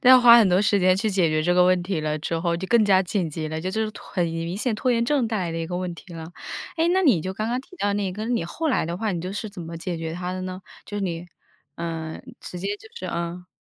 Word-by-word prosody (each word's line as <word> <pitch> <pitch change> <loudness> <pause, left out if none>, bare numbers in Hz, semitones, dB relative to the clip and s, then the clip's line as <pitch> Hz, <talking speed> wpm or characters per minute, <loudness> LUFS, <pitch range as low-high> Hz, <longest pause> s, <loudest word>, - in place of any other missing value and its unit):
要 255 0 +9
花 235 -1 +9
很 215 -5 +5
多 180 +1 +4
时 205 0 +3
间 185 0 +5
去 215 +2 0
解 185 -4 +3
决 155 0 +1
这 175 - +2
个 180 - +6
问 185 0 +4
题 180 -2 -2
了 155 0 -1
之 165 +2 -2
后， 170 0 0
就 190 - -4
更 235 -2 +5
加 190 -2 +5
紧 180 -2 -1
急 155 0 -4
了， 160 0 -3
就 185 +3 -2
是 220 +1 -1
拖 - - -12
很 180 - +1
明 165 +2 -3
显 230 +1 0
拖 255 +4 0
延 235 -1 +2
症 270 -1 +2
带 220 - -1
来 175 -3 -2
的 165 - -3
一 165 - -2
个 175 +1 -3
问 180 -1 -2
题 175 +2 -13
了。 165 -1 -6 0.5
诶， 325 +1 +3
那 375 +2 +3
你 245 - +5
就 185 +3 -3
刚 215 +2 -2
刚 245 +2 0
提 320 +7 -16
到 205 - +1
那 200 -2 -1
个， 215 +4 -4
你 235 -7 0
后 315 - -2
来 250 - +1
的 170 +1 -3
话， 215 +1 -1
你 170 - -2
就 185 +2 -4
是 210 +1 -4
怎 195 - -9
么 165 0 -7
解 170 +1 -3
决 160 0 -4
它 180 +1 -3
的 185 0 -4
呢？ 185 0 -5 0.3
就 205 - -5
是 205 - -2
你 175 -2 -3 0.5
呃， 165 -1 -4 0.2
直 180 - -7
接 195 +3 -3
就 220 - -15
是 185 - -6
呃。 170 +1 -4
185 Hz, 320 characters per minute, -24 LUFS, 170-215 Hz, 0.5 s, 要